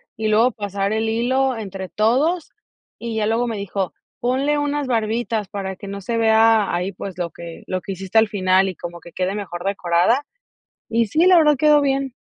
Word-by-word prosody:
y 220 0 -2
luego 220 +4 +4
pasar 200 -1 -2
el 220 0 0
hilo 255 +3 +1
entre 195 -3 -6
todos, 280 +11 +1 0.5
y 235 -1 -5
ya 215 - +1
luego 230 +3 +1
me 225 -2 -3
dijo: 200 -1 -3 0.3
"Ponle 270 +4 +1
unas 290 0 -1
barbitas 225 -2 -1
para 195 -2 -5
que 200 - -10
no 200 0 -6
se 230 +5 -2
vea 220 -1 +4
ahí, 180 +3 -1
pues, 190 0 -8
lo 175 -2 -3
que 170 +1 -10
lo 185 -1 -2
que 195 - -5
hiciste 190 +3 +1
al 220 - +3
final, 190 -2 +2
y 185 - -6
como 170 0 -8
que 170 - -13
quede 185 +1 -2
mejor 185 -4 -6
decorada". 195 +6 +2 0.7
Y 230 0 +1
sí, 315 - +2
la 370 -1 +7
verdad 300 -2 +4
quedó 300 0 +5
bien. 275 -2 0
220 Hz, 200 wpm, -21 LUFS, 195-245 Hz, 0.7 s, la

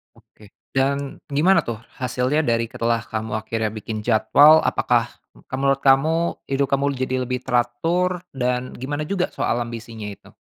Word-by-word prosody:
Oke, 105 -1 -20 0.2
dan 140 +1 -1
gimana 155 +7 +3
tuh 115 -3 -4 0.2
hasilnya 125 +3 0
dari 115 -1 +1
setelah 115 0 0
kamu 110 0 -3
akhirnya 110 0 -2
bikin 110 0 -5
jadwal, 145 +7 +6
apakah, - - +1 0.3
mmm, - - -19
kal 130 - -3
menurut 135 0 +2
kamu 135 +4 +4 0.3
hidup 135 0 0
kamu 140 +1 +2
jadi 130 0 -2
lebih 125 0 -2
teratur, 165 +9 0
dan 125 -1 -2
gimana 145 +4 -3
juga 185 -1 0
soal - - 0
ambisinya 115 -2 -6
itu? 100 -1 -10
130 Hz, 155 wpm, -22 LUFS, 115-140 Hz, 0.3 s, jadwal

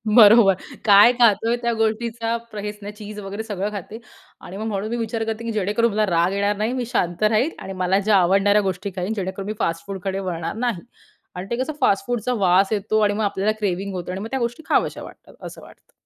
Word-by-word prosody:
बरोबर, 215 -3 +7 0.3
काय 205 +2 +8
खातोय 230 -1 +3
त्या 235 0 0
गोष्टीचा 225 +1 -1 0.2
प्र 210 - -6
हेच 210 0 -6
ना 205 - -6
चीज 210 0 -9
वगैरे 200 +2 -6
सगळं 205 -2 -3
खाते. 210 +2 -7 0.4
आणि 190 - -9
मग 215 - -4
म्हणून 205 0 -3
मी 235 - -2
विचार 225 -1 -2
करते, 225 0 -4
की 230 - -3
जेणेकरून 215 +2 +1
मला 215 +1 +1
राग 170 0 +2
येणार 200 +1 0
नाही. 215 +4 -1
मी 255 -2 -2
शांत 175 -2 -1
राहील 220 +8 +2
आणि 195 - -7
मला 190 +2 +2
ज्या 205 0 +3
आवडणाऱ्या 195 +3 +3
गोष्टी 195 0 -3
खाईन, 185 +3 -2
जेणेकरून 195 -1 -4
मी - - -1
फास्टफूडकडे 190 +3 -3
वळणार 175 -4 -4
नाही 220 -8 -1 0.5
आणि 180 +1 -5
ते - - +1
कसं 310 - -5
फास्टफूडचा 245 +3 +1
वास 185 +3 +4
येतो 215 +1 0
आणि 205 -1 +3
मग 215 +1 -2
आपल्याला 200 +1 0
क्रेव्हिंग 195 -1 -2
होतं 180 -1 -5
आणि 185 +1 -5
मग 220 - -5
त्या 265 - -1
गोष्टी 240 +5 -3
खाव्याशा - - 0
वाटतात, - - -14
असं - - -9
वाटतं. - - -18
210 Hz, 215 wpm, -22 LUFS, 195-225 Hz, 0.5 s, काय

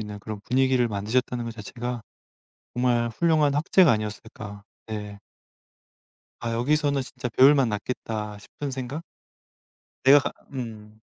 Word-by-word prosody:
있는 105 -1 -6
그런 105 0 -7
분위기를 130 +1 +2
만드셨다는 120 +4 -1
것 115 - -4
자체가 120 +2 -5 0.7
정말 120 -1 +2
훌륭한 155 0 +2
학자가 160 +1 +5
아니었을까. 105 -1 -5 0.2
네. 105 -2 -6 1.2
'아 115 -1 -2
여기서는 140 +3 +1
진짜 125 -1 -5
배울 135 +6 +7
맛 135 -3 +3
났겠다.' 105 -1 -4
싶은 140 +6 -6
생각? 130 +5 -5 1.0
내가 140 +2 +9
가 - - -3 0.2
음. 110 -4 -7
120 Hz, 280 characters per minute, -26 LUFS, 110-135 Hz, 1.2 s, 내가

